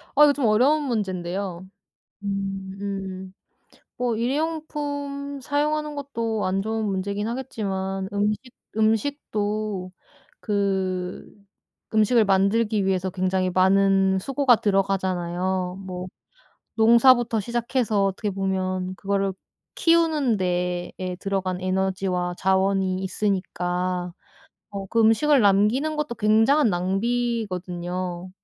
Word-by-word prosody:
아 295 - +7
이거 290 -1 +6
좀 280 -3 -1
어려운 260 +8 +4
문제인데요. 190 -6 -3 0.6
음. 195 -1 -4 0.6
뭐 245 -2 -1
1 235 +3 0
회용품 285 -2 -3
사용하는 300 +2 -1
것도 230 -6 -2
안 190 +1 0
좋은 220 +1 -2
문제이긴 200 +1 -2
하겠지만 195 -6 -3
음식, 205 +1 +1 0.4
음식도 215 -4 -1 0.5
그 190 -3 -1 0.7
음식을 220 +1 +4
만들기 200 +1 +2
위해서 190 -1 0
굉장히 185 0 0
많은 190 +1 +3
수고가 270 +2 +3
들어가잖아요. 185 -2 -1
뭐 180 -1 -5 0.7
농사부터 235 +1 +5
시작해서 235 -1 0
어떻게 195 +2 -2
보면 185 -1 -2
그거를 195 0 -1 0.4
키우는 325 - +3
데에 180 -1 -1 0.3
들어간 190 -2 -2
에너지와 185 -1 -1
자원이 190 0 +1
있으니까 180 -2 -2 0.6
어 200 -1 -5
그 230 - +2
음식을 265 +6 +4
남기는 215 +10 +3
것도 300 -5 -2
굉장한 225 +7 +4
낭비거든요. 185 -3 -2
200 Hz, 245 characters per minute, -24 LUFS, 185-235 Hz, 0.7 s, 아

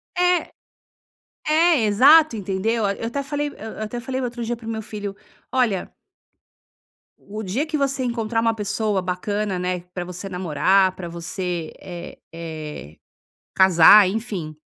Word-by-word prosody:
É. 360 0 +1 0.9
É 315 -4 +3
exato, 275 +5 +6
entendeu, 205 +3 -1
eu 200 +3 -4
até 280 +4 -3
falei 290 +1 -2
eu - - -11 0.2
eu - - -7
até 215 +3 -4
falei 260 +2 -4
outro 240 -2 -4
dia 240 +1 -2
para 225 -1 -10
meu 225 -1 -3
filho: 205 -2 -6 0.4
"Olha" 235 -8 0 1.3
O 215 +2 -8
dia 220 +10 -1
que 315 -1 -2
você 275 -2 -1
encontrar 230 -2 -1
uma 230 0 +2
pessoa 210 -1 -1
bacana, 190 +2 -2
né, 180 0 -2
pra 180 - -3
você 180 +2 -7
namorar 185 +1 +2
pra 185 -2 -7
você, 170 0 -4
eh 175 -2 -9 0.2
eh, 155 - -7 0.6
casar, 190 +2 +7
enfim, 195 -7 -4
210 Hz, 145 wpm, -22 LUFS, 180-240 Hz, 1.3 s, casar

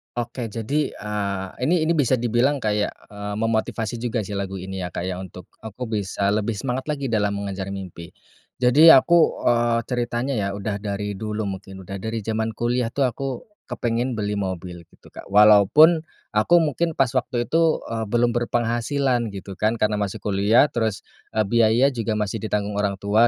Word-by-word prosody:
Oke 120 0 -4
jadi, 115 +7 -2
eee, 100 -2 -3 0.2
ini 170 0 +2
ini 160 - +1
bisa 135 -3 +3
dibilang 120 +4 +1
kayak, 105 -1 0 0.2
eee, 105 0 -6
memotivasi 115 +1 -1
juga 115 -2 -2
sih 100 0 -5
lagu 95 -1 -4
ini 95 +1 -6
ya 90 - -3
Kak - - -3
ya 90 0 -3
untuk, 90 -1 -10
aku 110 +3 -8 0.2
bisa 100 0 -1
lebih 105 +1 -1
semangat 130 +5 -3
lagi 140 -4 -2
dalam 105 -2 +1
mengejar 100 -1 -4
mimpi. 90 -3 -8 0.5
Jadi 130 +6 +5
aku, 165 +5 +4
eee, 120 -1 +3
ceritanya 120 +1 -2
ya 105 -5 -1
udah 100 0 -3
dari 105 0 -3
dulu 110 0 -3
mungkin, 95 -1 -7
udah 95 +2 -6
dari 110 0 -4
zaman 110 +1 -2
kuliah 120 +1 0
tuh 140 +4 -1
aku 130 +2 -3 0.4
kepengen 120 +1 -2
beli 105 -1 -2
mobil 90 -2 -5
gitu - - -21
Kak. - - -11
Walaupun, 105 - +6 0.3
aku 110 +10 +3
mungkin 160 +2 -1
pas 135 -3 +2
waktu 125 -1 -1
itu, 165 +2 +2
eee, 115 -1 -3
belum 120 +2 +2
berpenghasilan 120 +2 0
gitu 100 -1 -9
kan, 110 +2 +1
karena 105 -2 0
masih 100 -2 -4
kuliah 105 +7 +3
terus, 110 -4 -2 0.3
eee, 110 - +3
biaya 115 +3 +3
juga 115 -3 -2
masih 105 +1 -2
ditanggung 105 0 -2
orang 100 -1 0
tua 105 +4 +3
110 Hz, 175 wpm, -23 LUFS, 100-120 Hz, 0.5 s, Walaupun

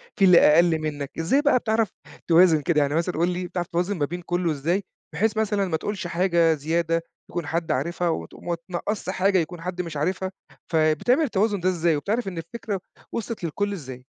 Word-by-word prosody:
في 200 - +4
اللي 180 -2 +8
أقل 160 +1 +5
منّك. 145 -3 -4
إزاي 220 - +2
بقى 285 -4 +4
بتعرف 220 -2 +1 0.4
توازن 165 -2 +6
كده؟ 150 0 +2
يعني 145 +1 0
مثلًا 170 +1 0
قل 175 +2 +3
لي 180 0 -3
بتعرف 175 -1 -3
توازن 180 +2 -1
ما 145 - +1
بين 175 +4 -6
كلّه 175 -1 -1
إزاي، 165 +7 0 0.3
بحيث 215 +7 0
مثلًا 210 -2 +1
ما 160 - 0
تقولش 195 0 -4
حاجة 170 -2 +3
زيادة 165 +2 0 0.3
يكون 175 -4 -4
حد 165 0 -1
عارفها 170 +5 0
وت 160 - -4
ما 170 -1 -3
تنقصش 185 +2 -3
حاجة 190 0 +2
يكون 170 +1 -4
حد 180 +1 -3
مش 165 -4 -6
عارفها؟ 185 +5 -1 0.4
فبتعمل 160 - +3
التوازن 205 -5 +1
ده 185 - +1
إزاي؟ 170 -3 +1
وبتعرف 205 +10 -1
إن 180 -3 -5
الفكرة 195 +3 -5 0.3
وصلت 230 -4 -4
للكل 205 +5 -1
إزاي؟ 130 -7 -8
175 Hz, 195 wpm, -24 LUFS, 160-195 Hz, 0.4 s, اللي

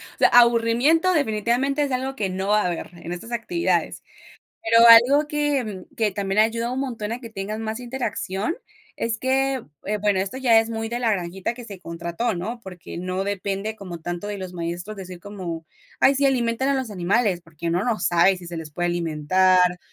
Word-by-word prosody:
O - - -29
sea, - - +6
aburrimiento 240 +9 +4
definitivamente 265 +2 +1
es 280 - -2
algo 265 +1 -2
que 200 -6 -2
no 190 +1 -3
va 210 0 +4
a - - -1
haber 175 -1 -4
en 170 0 -8
estas 180 +7 -7
actividades. 340 +10 -1 0.6
Pero 230 +1 +6
algo 260 +6 +7
que 275 -10 -1
que 220 -5 +1
también 195 +1 -1
ayuda 230 +2 0
un 260 - -2
montón 230 -5 -4
a 240 - -3
que 230 -3 -9
tengan 215 +1 -5
más 220 +2 -4
interacción 240 - -3 0.4
es 230 -1 -2
que, 265 +1 0 0.2
eh, 210 +1 -1
bueno, 205 -2 +2
esto 195 +7 -3
ya 240 -4 +5
es 225 0 -2
muy 225 0 -3
de 240 +1 -3
la 230 -2 +2
granjita 185 +2 -2
que 245 - -10
se 200 -5 -9
contrató, 170 +6 -3
¿no? 215 +8 -4
Porque 185 -7 -9
no 185 +2 -2
depende 200 +2 -3
como 180 -5 -8
tanto 175 +4 -5
de 205 -1 -4
los 185 -2 -6
maestros 175 +4 -5
decir 185 -2 -8
como: 175 -5 -6 0.4
"Ay, 275 - +5
sí, 280 - +2
alimenten 250 -1 +1
a 280 - +2
los 260 -3 -2
animales", 195 +1 +1
porque 165 0 -8
uno 175 +3 +1
no 235 -3 +1
sabe 175 +3 +4
si 180 -1 -11
se 170 0 -6
les 160 -2 -7
puede 175 +3 -1
alimentar 180 +2 +2
215 Hz, 200 wpm, -23 LUFS, 185-240 Hz, 0.6 s, algo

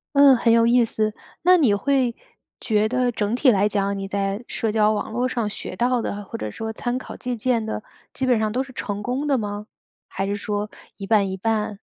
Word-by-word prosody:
嗯， 280 -2 +8
很 230 -1 +2
有 230 0 +5
意 240 0 +5
思。 215 -1 -1 0.3
那 365 +1 +6
你 255 -11 +4
会 255 +1 +1 0.4
觉 215 -1 +1
得 250 -1 +1
整 215 +1 -1
体 255 0 +5
来 205 0 +3
讲 200 -1 -1
你 195 0 -4
在 200 +3 -2
社 220 -2 -2
交 215 -1 +3
网 215 +1 -2
络 245 +3 0
上 235 -4 -1
学 - - -7
到 245 0 +1
的， 205 -1 -4
或 - - -6
者 105 0 -4
说 220 - -5
参 245 +2 -2
考 - - -8
借 250 -1 -4
鉴 230 -1 0
的， 220 -1 -4 0.3
基 265 - -2
本 245 -3 +3
上 215 -1 0
都 255 +3 0
是 265 - -13
成 205 -2 -4
功 265 +4 -2
的 275 -2 +3
吗？ 205 0 -4 0.4
还 195 - -3
是 200 +1 -1
说 205 0 -3 0.3
一 195 - -7
半 200 -2 +3
一 190 - -4
半？ 210 -1 -1
220 Hz, 240 characters per minute, -23 LUFS, 205-250 Hz, 0.4 s, 嗯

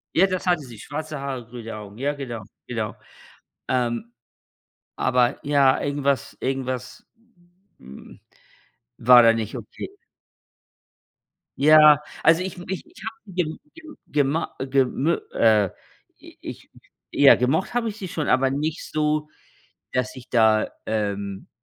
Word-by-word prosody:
Ja, 185 - +6
das 185 -1 -3
hatte 175 -3 +3
sie, 120 -6 -11
schwarze 150 +4 -6
Haare, 135 -3 -5
grüne 115 -1 -8
Augen. 105 -1 -10
Ja, 140 +4 -1
genau, 120 -6 -6 0.2
genau. 110 -3 -3 0.7
Ähm, 120 -2 -1 0.8
aber 125 -1 +1
ja, 140 -2 +4
irgendwas 140 -1 -1
irgendwas 130 -1 -4 0.7
hm, 65 +1 -13 0.8
war 120 +1 +8
da 115 -1 +6
nicht 115 +1 -3
okay. 115 -3 -8 1.7
Ja, 150 0 +7 0.2
also 165 +2 +4
ich 190 - -5
m 180 - -9
ich 190 - -4
ich - - -17
habe 220 -3 -9
gem 170 -3 -2 0.2
gem 320 -2 -13
gemo 145 +2 0
gemö 135 +4 +1 0.2
äh, 105 -4 +4 0.5
i - - -15
ich - - -9 0.4
ich - - 0
ja 140 - +10
gemocht 150 - 0
habe 240 -2 0
ich 210 - -8
sie 195 - -6
schon, 155 -3 -3
aber 130 0 +3
nicht 150 +4 -2
so, 150 0 0 0.6
dass 125 0 -1
ich 130 -1 -12
da, 110 -2 +3 0.2
ähm 100 -2 -3
135 Hz, 135 wpm, -23 LUFS, 120-155 Hz, 1.7 s, ja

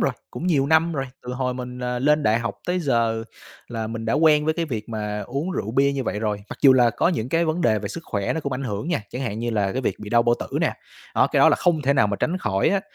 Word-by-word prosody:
rồi, - - +2 0.2
cũng 175 - -5
nhiều 145 -6 +2
năm 160 +3 +3
rồi, 135 -4 -2 0.2
từ 125 - -6
hồi 125 0 -2
mình, 125 0 -6
à, 125 0 -1
lên 150 +4 +3
đại 110 -4 +3
học 120 0 -3
tới 180 +1 0
giờ 115 -6 +1 0.4
là 115 -2 -4
mình 115 0 -5
đã 115 - 0
quen 150 -2 +4
với 155 +1 +1
cái 170 - -1
việc 115 -8 -5
mà 105 -2 -3
uống 140 - -3
rượu 145 - -3
bia 140 +3 +3
như 135 -2 -3
vậy 105 - -2
rồi. 105 -2 -2
Mặc - - -7
dù 135 -2 +8
là 125 -2 +4
có 120 - +1
những 155 -10 -1
cái 165 +4 +2
vấn 160 +2 -1
đề 110 -8 +3
về 100 0 -5
sức 165 - -6
khỏe 100 -3 -2
nó 160 - -2
cũng 140 -2 -3
ảnh 130 +2 -3
hưởng 105 +4 -3
nha, 175 -11 0
chẳng 125 - -4
hạn 110 -4 -3
như 120 +1 -2
là 100 -3 0
cái 130 - -2
việc 100 -5 -1
bị 105 -1 -8
đau 120 -1 +4
bao 120 0 +3
tử - - -3
nè, - - +1 0.4
đó, - - +4
cái - - +1
đó - - +7
là - - +3
không 165 -4 +1
thể 140 +1 +3
nào 135 -6 +3
mà 100 0 -2
tránh 170 - 0
khỏi 95 - +1
á, 195 +3 +1
125 Hz, 305 wpm, -23 LUFS, 110-150 Hz, 0.4 s, dù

